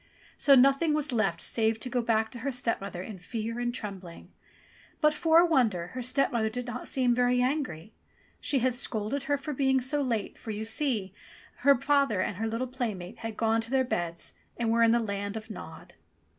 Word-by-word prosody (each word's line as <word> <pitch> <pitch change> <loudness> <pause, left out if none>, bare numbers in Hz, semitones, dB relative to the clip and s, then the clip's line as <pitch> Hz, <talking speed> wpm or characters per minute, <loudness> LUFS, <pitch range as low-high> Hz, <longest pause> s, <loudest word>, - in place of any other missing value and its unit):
So 280 - +5
nothing 275 +4 +4
was 300 -2 0
left 195 -8 +1
save 225 -1 0
to - - -2
go 250 0 0
back 220 -1 +1
to 240 - -7
her 275 +4 -2
stepmother 215 -7 -2
in 200 -2 -8
fear 225 +5 -4
and 240 0 0
trembling. 195 -7 -8 0.7
But, 300 -1 +4
for 320 +1 +3
a 345 - +7
wonder, 220 - +1
her 255 - -5
stepmother 250 -3 +1
did 245 +2 -5
not 245 0 -6
seem 250 -2 +2
very 245 0 +2
angry. 250 - -2 0.5
She 280 - 0
only 255 +1 +3
scolded 240 +1 -1
her 285 +1 +1
for 280 +2 -5
being 265 -1 +2
so 265 +4 +1
late, 235 -6 -2
for, 225 - -6
see 240 +1 0
you, 190 - -12 0.5
her 280 0 +5
father 275 -8 +2
and 185 0 -1
her 225 +2 -1
little 230 +3 -2
playmate 230 -6 -5
had 225 -1 -6
gone 225 0 +2
to 225 - -7
their 265 0 +2
beds 170 -7 -3 0.2
and 230 -1 0
were 230 0 +3
in 230 - +6
the 235 +1 +4
Land 200 -1 -3
of 220 0 -8
Nod. - - -10
240 Hz, 200 wpm, -28 LUFS, 220-265 Hz, 0.7 s, a